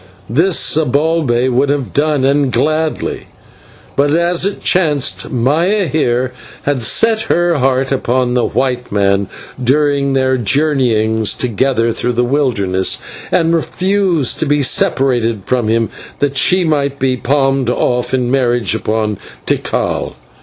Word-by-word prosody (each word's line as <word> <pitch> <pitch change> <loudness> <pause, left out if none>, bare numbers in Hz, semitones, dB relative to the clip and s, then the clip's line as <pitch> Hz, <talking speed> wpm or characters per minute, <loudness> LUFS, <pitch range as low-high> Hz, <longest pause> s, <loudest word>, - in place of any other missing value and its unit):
This 165 +8 +2
Zibalbay 150 -3 +1
would 130 +3 +1
have 140 -3 -2
done, 145 -2 +1
and 140 -1 +2
gladly; 155 +2 -1 0.7
but, 145 +2 +2
as 175 +2 +1
it 200 - -6
chanced, 150 -7 +1
Maya 165 - +1
here 130 -4 0 0.3
had 145 -2 0 0.5
her 175 0 +2
heart 130 +1 +1
set 135 - +1
upon 125 0 0
the 125 -1 +1
white 125 -2 -2
man 100 -1 +1 0.4
during 140 +1 +1
their 130 -1 +1
journeyings 110 -4 +1
together 115 0 0
through 125 +2 -2
the 120 +1 +1
wilderness, 115 -9 0 0.3
and 165 0 +2
refused 180 -3 0
to 160 - -1
be 145 0 +1
separated 120 -5 +1
from 125 -3 0
him 115 0 +1 0.3
that 140 -1 -1
she 180 +7 +3
might 140 -4 0
be 130 -1 0
palmed 135 0 0
off 125 0 0
in 125 -2 0
marriage 120 -6 +1
upon 110 -2 -2 0.3
Tikal. - - -1
135 Hz, 130 wpm, -15 LUFS, 120-150 Hz, 0.7 s, she